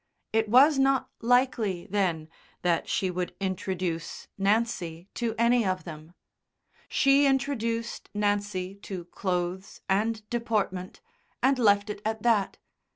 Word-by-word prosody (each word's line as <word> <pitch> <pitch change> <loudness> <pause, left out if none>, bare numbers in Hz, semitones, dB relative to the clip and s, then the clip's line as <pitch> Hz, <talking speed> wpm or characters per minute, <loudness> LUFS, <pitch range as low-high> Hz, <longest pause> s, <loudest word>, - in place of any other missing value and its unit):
It 220 -1 +2
was 270 +5 +6
not 270 -1 +2
likely, 230 -6 +2
then, 180 -6 0 0.4
that 175 -2 +1
she 190 -2 0
would 180 0 -3
introduce 185 -3 -3
Nancy 195 -4 -1
to 230 -2 -2
any 235 +1 +4
of 185 -2 -1
them. 160 0 -10 0.7
She 275 +1 +4
introduced 235 -4 -1
Nancy 205 -2 -1
to 185 -3 -6
clothes 180 +1 -3
and 215 +2 0
deportment, 210 -6 -2 0.4
and 265 0 +3
left 205 -3 +4
it 205 - -8
at 220 0 -3
that. 225 -5 +2
205 Hz, 120 wpm, -27 LUFS, 185-235 Hz, 0.7 s, was